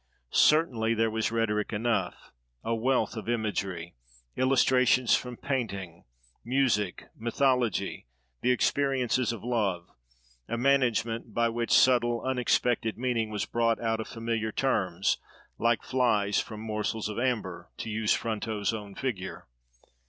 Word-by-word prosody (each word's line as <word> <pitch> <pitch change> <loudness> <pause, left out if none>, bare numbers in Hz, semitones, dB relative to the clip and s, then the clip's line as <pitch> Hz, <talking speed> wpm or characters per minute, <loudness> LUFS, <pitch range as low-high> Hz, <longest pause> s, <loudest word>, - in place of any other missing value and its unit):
Certainly 120 -8 +3
there 115 0 +1
was 110 0 -1
rhetoric 105 -2 0
enough:—a 95 - -3
wealth 125 +3 +1
of 110 +1 -6
imagery; 100 -7 -2 0.4
illustrations 130 -1 +3
from 125 -1 -4
painting, 100 -10 -4 0.4
music, 120 -7 0
mythology, 120 - 0 0.3
the - - +1
experiences 130 -2 +1
of 115 -4 -7
love; 105 -8 -1 0.6
a - - -2
management, 120 -4 +1
by 115 0 +3
which 115 0 -2
subtle, 120 -2 +4
unexpected 125 -3 +1
meaning 120 -3 0
was 105 -1 -2
brought 115 -1 +1
out 115 -1 -1
of 110 - -4
familiar 115 -1 -2
terms, 95 -8 0 0.4
like 115 -1 +2
flies 110 -6 +2
from 110 -1 -5
morsels 110 0 -2
of 105 +1 -4
amber, 125 -3 -2
to 110 - -5
use 110 0 0
Fronto's 110 -2 -2
own 105 -3 -7
figure. 105 -9 -4
115 Hz, 125 wpm, -28 LUFS, 105-125 Hz, 0.6 s, subtle